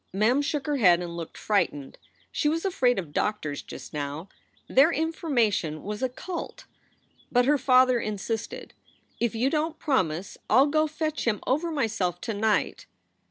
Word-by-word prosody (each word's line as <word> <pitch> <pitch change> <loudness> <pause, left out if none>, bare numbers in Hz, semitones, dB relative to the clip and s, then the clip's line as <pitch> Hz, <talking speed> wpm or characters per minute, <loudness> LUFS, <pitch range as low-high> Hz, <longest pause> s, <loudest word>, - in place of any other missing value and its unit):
Mem 220 +8 +2
shook 285 -1 -2
her 295 -1 0
head 180 -8 +5
and 175 -1 -5
looked 165 -2 -7
frightened. 170 -9 -1 0.3
She 295 - +1
was 330 +4 -1
afraid 255 -10 +2
of 165 -6 -5
doctors 155 -9 -1
just - - -10
now; 150 +5 -4 0.4
their 280 +5 +5
information 240 - 0
was 210 +1 -5
occult. 260 +8 -5 0.7
But 245 0 +4
her 290 +1 +3
father 255 -1 +5
insisted: 215 +1 -4 0.5
"If 235 -1 0
you 250 +5 +1
don 315 +1 0
t - - -36
promise, 185 - -1
I 260 - +6
ll - - +6
go 310 +1 +2
fetch 310 0 -3
him 210 -3 +1
over 305 +6 0
myself 220 - -1
to 225 - -3
night." 210 +1 0
240 Hz, 160 wpm, -26 LUFS, 190-295 Hz, 0.7 s, I